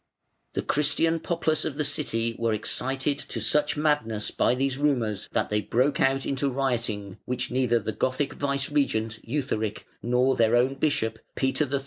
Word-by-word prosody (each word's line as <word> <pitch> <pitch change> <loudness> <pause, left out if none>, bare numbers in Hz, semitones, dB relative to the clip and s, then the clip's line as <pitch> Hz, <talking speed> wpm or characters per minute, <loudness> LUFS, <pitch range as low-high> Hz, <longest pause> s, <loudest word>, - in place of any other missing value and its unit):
The - - -2
Christian 160 +3 +2
populace 160 -2 0
of 145 -3 -3
the 150 - +1
city 115 -6 0
were 115 -1 +1
excited 135 +6 0
to 120 - -4
such 145 +8 +2
madness 145 -9 0
by 125 - +2
these 135 +1 -1
rumours 120 -9 0
that - - -1
they 105 0 +2
broke 130 +7 +1
out 135 0 +2
into 140 0 0
rioting, 115 -7 -2
which 125 0 -2
neither 125 -2 +2
the 110 -1 -2
Gothic 130 +5 -1
vicegerent, 140 -6 -1
Eutharic, 115 -5 -2 0.2
nor 125 +2 +2
their 115 0 +3
own 125 +3 +3
bishop, 135 -6 0 0.2
Peter 130 +1 0
III. 140 - +1
130 Hz, 160 wpm, -26 LUFS, 115-145 Hz, 0.2 s, their